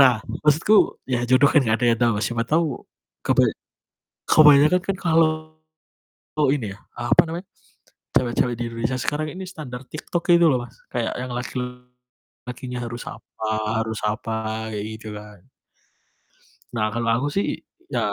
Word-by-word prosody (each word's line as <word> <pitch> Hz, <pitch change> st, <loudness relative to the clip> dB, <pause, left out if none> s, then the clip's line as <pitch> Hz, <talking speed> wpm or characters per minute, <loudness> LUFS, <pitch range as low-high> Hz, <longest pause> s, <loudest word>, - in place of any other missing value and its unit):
Nah, 130 Hz, -3 st, +7 dB, 0.3 s
maksudku 155 Hz, +8 st, +4 dB, 0.3 s
ya 125 Hz, -2 st, 0 dB
jodoh 130 Hz, +2 st, +6 dB
kan 150 Hz, -, +6 dB
nggak 110 Hz, -2 st, +2 dB
ada 125 Hz, -, +1 dB
yang 115 Hz, -, -1 dB
tahu, 120 Hz, -1 st, +4 dB
Mas. 105 Hz, -, -1 dB
Siapa 120 Hz, -1 st, -1 dB
tahu 165 Hz, +2 st, +3 dB, 0.6 s
kebay -, -, +4 dB, 0.8 s
kebanyakan 150 Hz, +3 st, +7 dB
kan 195 Hz, -1 st, -1 dB
kalau 160 Hz, -1 st, +4 dB, 1.2 s
ini 110 Hz, -9 st, -3 dB
ya, 100 Hz, -, -13 dB, 0.2 s
apa 120 Hz, +8 st, +4 dB
namanya, 175 Hz, +3 st, -5 dB, 0.7 s
cewek-cewek 120 Hz, 0 st, +2 dB
di 120 Hz, -, -3 dB
Indonesia 115 Hz, +2 st, -2 dB
sekarang 150 Hz, +5 st, -1 dB
ini 190 Hz, -, -6 dB
standar 140 Hz, -9 st, -8 dB
TikTok 165 Hz, +4 st, -4 dB
gitu 170 Hz, 0 st, +6 dB
loh, 125 Hz, -4 st, +2 dB
Mas, 120 Hz, -, -15 dB, 0.2 s
kayak 120 Hz, -2 st, -1 dB
yang 125 Hz, 0 st, -4 dB
laki-lakinya 125 Hz, 0 st, -7 dB
harus 120 Hz, +1 st, -6 dB
apa 110 Hz, -, -8 dB, 0.4 s
harus 110 Hz, -1 st, -4 dB
apa 110 Hz, +1 st, -2 dB, 0.4 s
kayak 105 Hz, -1 st, -3 dB
gitu 110 Hz, 0 st, -10 dB
kan. 105 Hz, -3 st, -13 dB, 1.3 s
Nah, 110 Hz, -2 st, +1 dB
kalau 115 Hz, 0 st, -1 dB
aku 135 Hz, +5 st, -1 dB
sih 200 Hz, -, +2 dB, 0.5 s
ya -, -, +1 dB
125 Hz, 150 wpm, -23 LUFS, 115-150 Hz, 1.3 s, Nah